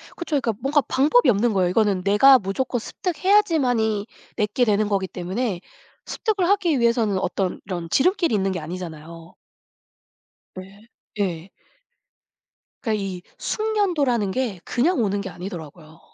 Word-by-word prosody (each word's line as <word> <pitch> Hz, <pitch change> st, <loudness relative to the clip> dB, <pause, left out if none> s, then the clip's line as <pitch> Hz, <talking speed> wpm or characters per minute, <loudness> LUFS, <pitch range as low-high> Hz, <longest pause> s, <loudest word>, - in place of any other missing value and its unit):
그쵸. 320 Hz, -4 st, -1 dB
그러니까 235 Hz, -3 st, -1 dB
뭔가 285 Hz, +3 st, +2 dB
방법이 300 Hz, -, +3 dB
없는 225 Hz, +1 st, +2 dB
거예요. 185 Hz, -2 st, +2 dB
이거는 200 Hz, -1 st, +1 dB
내가 210 Hz, +8 st, +6 dB
무조건 240 Hz, +6 st, -2 dB
습득해야지만이 280 Hz, -, +1 dB, 0.3 s
내 210 Hz, -, +1 dB
게 245 Hz, +3 st, +2 dB
되는 210 Hz, -1 st, +2 dB
거기 195 Hz, -2 st, 0 dB
때문에 185 Hz, +2 st, -3 dB, 0.5 s
습득을 405 Hz, -6 st, -1 dB
하기 355 Hz, -8 st, +2 dB
위해서는 235 Hz, -4 st, +2 dB
어떤 190 Hz, -1 st, -2 dB
이런 175 Hz, -3 st, -4 dB
지름길이 345 Hz, -, +2 dB
있는 195 Hz, -1 st, 0 dB
게 180 Hz, -, -3 dB
아니잖아요. 165 Hz, 0 st, -9 dB, 1.2 s
네. 195 Hz, +4 st, -12 dB, 0.3 s
예. 180 Hz, -2 st, -2 dB, 1.3 s
그러니까 215 Hz, -5 st, -1 dB
이 185 Hz, -2 st, -5 dB, 0.2 s
숙련도라는 340 Hz, -, 0 dB
게 220 Hz, -5 st, -2 dB
그냥 295 Hz, +6 st, +1 dB
오는 200 Hz, -1 st, -1 dB
게 195 Hz, -, -6 dB
아니더라고요. 165 Hz, -3 st, -9 dB
215 Hz, 330 characters per minute, -23 LUFS, 185-270 Hz, 1.3 s, 내가